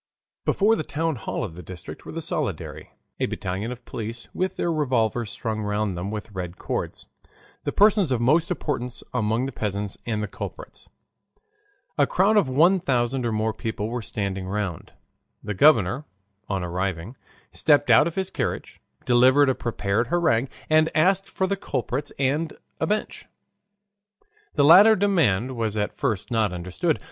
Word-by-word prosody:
Before 215 +3 +3
the - - -2
town 160 0 -2
hall 110 - -4
of 100 -9 -5
the 90 - -9
district 90 +1 -9
were - - -6
the - - -5
soldiery, - - -4 0.3
a - - +1
battalion 95 +6 -3
of 125 -1 -9
police 115 +1 -6
with 185 +1 -1
their 170 - -1
revolvers 120 -7 0
slung 110 -2 -3
round 105 -2 -1
them 90 +3 -4
with 105 +1 -6
red 90 -2 -6
cords, - - -4 0.6
the - - 0
persons 205 -6 +4
of 125 - +1
most 155 +8 +3
importance 125 -8 -3
among 110 +4 0
the 135 - -4
peasants, 100 -3 -3
and 110 -2 -1
the - - -2
culprits. - - -9 1.1
A - - +5
crowd 200 +4 +3
of 205 -10 +3
one 170 +9 +4
thousand 125 -4 0
or - - -1
more 110 0 0
people 110 -1 -4
were 120 +1 -3
standing 95 -3 -3
round. 100 -4 -3 0.5
The 105 - -3
governor, 120 - +4 0.4
on 95 -2 -1
arriving, 90 +4 -3 0.4
stepped 145 -2 +3
out - - +6
of 170 - -5
his 190 -1 -2
carriage, - - -4 0.2
delivered 130 +3 +5
a - - +3
prepared 115 -2 -1
harangue, 140 -6 +2 0.2
and 155 +1 +4
asked 195 +4 +3
for 190 - -1
the 200 +1 0
culprits 135 -5 -3
and 145 +4 0 0.3
a - - 0
bench. 210 +1 -2 1.3
The 145 - +4
latter 200 +8 +9
demand 130 - +2
was 110 -2 -2
at 105 0 -1
first 115 -8 -2
not 110 -4 +2
understood. 95 - -1
120 Hz, 165 wpm, -24 LUFS, 105-155 Hz, 1.3 s, latter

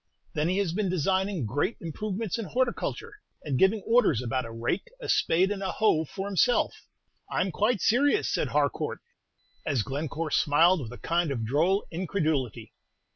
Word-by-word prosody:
Then 155 +2 0
he 185 - 0
has 195 -5 0
been 200 0 0
designing 185 - 0
great 145 - -1
improvements 210 +6 -3
in 225 - -3
horticulture, 255 - -2 0.3
and 140 -4 -1
giving 195 +1 +3
orders 225 - +3
about 125 +1 -2
a 115 - -8
rake, 115 - -2
a - - -7
spade, 185 +4 +2
and 200 -1 -3
a 190 - -2
hoe 165 -8 +2
for 195 +6 -6
himself. 205 +5 +2 0.6
I - - -1
'm 190 - 0
quite 210 +3 +1
serious," 285 - +3
said - - 0
Harcourt, - - -1 0.6
as 135 -7 0
Glencore 150 +5 -4
smiled 165 +5 +4
with 115 -3 -7
a 125 - -9
kind 170 -1 0
of 120 -5 -2
droll 165 - +2
incredulity. 160 - -2
175 Hz, 170 wpm, -27 LUFS, 145-205 Hz, 0.6 s, smiled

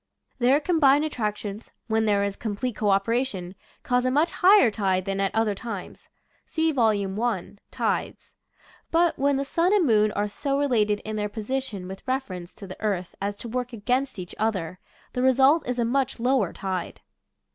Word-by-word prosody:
Their 260 +4 +4
com 325 +1 0
bined 285 +2 +5
attractions, 210 -6 -4 0.2
when 220 0 +1
there 205 -2 +2
is 200 -1 -2
complete 225 +2 -3
co 210 - 0
operation, 195 -2 0 0.3
cause 250 0 +1
a 255 - +2
much 295 +6 +2
higher 375 - +5
tide 190 -3 0
than 195 0 -2
at 195 - +2
other 220 -2 +2
times. 205 -2 -8 0.4
(See 320 -1 +1
Vol. 210 -7 +1
I, 220 -6 -2
"Tides.") - - -3 0.6
But 335 -1 +2
when 280 0 +2
the 275 - -1
sun 335 +6 +1
and 385 -5 +3
moon 215 -4 +3
are 205 +1 0
so 275 +6 -2
related 215 -7 +1
in 215 0 -5
their 210 0 -1
position 220 -3 -4
with 190 +1 -8
reference 190 -10 -4
to 200 - -10
the 185 -1 -10
earth 195 -5 -2
as 200 +1 -2
to 235 - -8
work 250 +1 -3
against 250 +4 -1
each 180 -1 -7
other, 185 -5 -1 0.3
the 250 - -1
result 265 +4 +4
is 250 0 -2
a 235 - +1
much 260 +1 0
lower 245 -6 +2
tide. 185 -3 -4
225 Hz, 180 wpm, -25 LUFS, 200-265 Hz, 0.6 s, bined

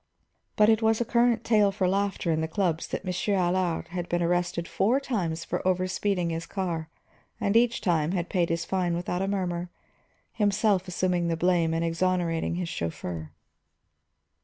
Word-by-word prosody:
But 210 - +5
it 220 0 +4
was 220 0 +3
a 240 - 0
current 235 -1 +2
tale 210 -3 +4
for 190 -2 0
laughter 195 -2 0
in 160 0 +1
the 160 - -1
clubs 170 -2 -1
that - - -5
Monsieur 185 +3 0
Allard 180 -2 0
had 175 0 -4
been 175 0 +1
arrested 175 0 0
four 205 +10 +2
times 175 -12 -2
for - - -2
over 185 0 +2
speeding 185 -2 -1
his 165 0 -4
car 170 -5 -3 0.5
and 200 +1 0
each 235 0 +3
time 170 -3 +1
had 175 -2 -1
paid 175 -3 0
his 165 0 -1
fine 180 -3 0
without 180 +1 -2
a 195 - 0
murmur, 180 -3 -2 0.6
himself 200 -2 +2
assuming 180 -1 0
the 165 -1 0
blame 170 -1 +2
and 165 +1 0
exonerating 170 -1 0
his 180 -1 -2
chauffeur. 85 - -5
180 Hz, 175 wpm, -27 LUFS, 170-200 Hz, 0.6 s, But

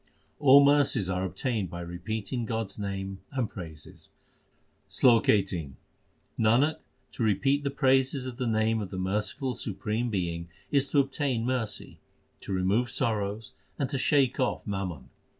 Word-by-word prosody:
All 140 0 +8
mercies 140 -9 +3
are 90 0 -1
obtained 105 0 -2
by 85 +1 -6
repeating 105 +7 -4
God 110 -3 -2
s 100 - -9
name 95 -1 -4
and 130 -4 0
praises: 80 -7 -10 0.8
SLOK 120 -3 +4
XVIII 90 -9 +1 0.6
Nanak, 120 +8 +3 0.3
to - - -7
repeat 135 +7 +2
the 140 - 0
praises 135 -1 +2
of 125 -2 -6
the 125 -2 -2
name 110 0 +1
of 100 - -5
the 95 - -6
merciful 105 +8 -1
supreme 120 0 -3
Being 85 -4 -3 0.2
Is 140 -2 +2
to 145 - +3
obtain 135 -4 0
mercy, 120 -5 -3 0.4
to - - -7
remove 95 +6 +1
sorrows, 110 -3 -1 0.2
and 135 -2 -2
to 135 - -1
shake 130 0 +2
off 130 - 0
mammon. 90 -10 -4
110 Hz, 150 wpm, -28 LUFS, 95-130 Hz, 0.8 s, All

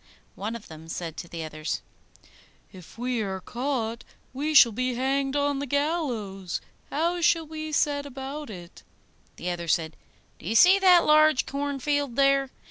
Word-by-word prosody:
One 215 +4 -5
of 230 - -9
them 160 0 -12
said 165 -1 -5
to 170 - -6
the 165 -1 -6
others, 155 0 -4 0.9
'If 185 +1 -14
we 245 -1 -1
are 190 -2 -3
caught, 235 0 -3 0.3
we 300 +4 -2
shall 240 -5 +9
be 255 +3 -1
hanged 270 +2 0
on 285 -1 +1
the 285 - -4
gallows; 245 - -2 0.3
how 340 +4 0
shall 330 -1 +3
we 310 0 -6
set 285 -1 +1
about 275 +1 -7
it?' 175 -4 -10 0.5
The 180 - -3
other 170 -1 -5
said, 160 -1 0 0.4
'Do - - -10
you 220 - -1
see 370 - +7
that 365 -3 +6
large 310 -2 +5
cornfield 285 -1 -2
there? 275 0 +3
265 Hz, 160 wpm, -26 LUFS, 200-290 Hz, 0.9 s, shall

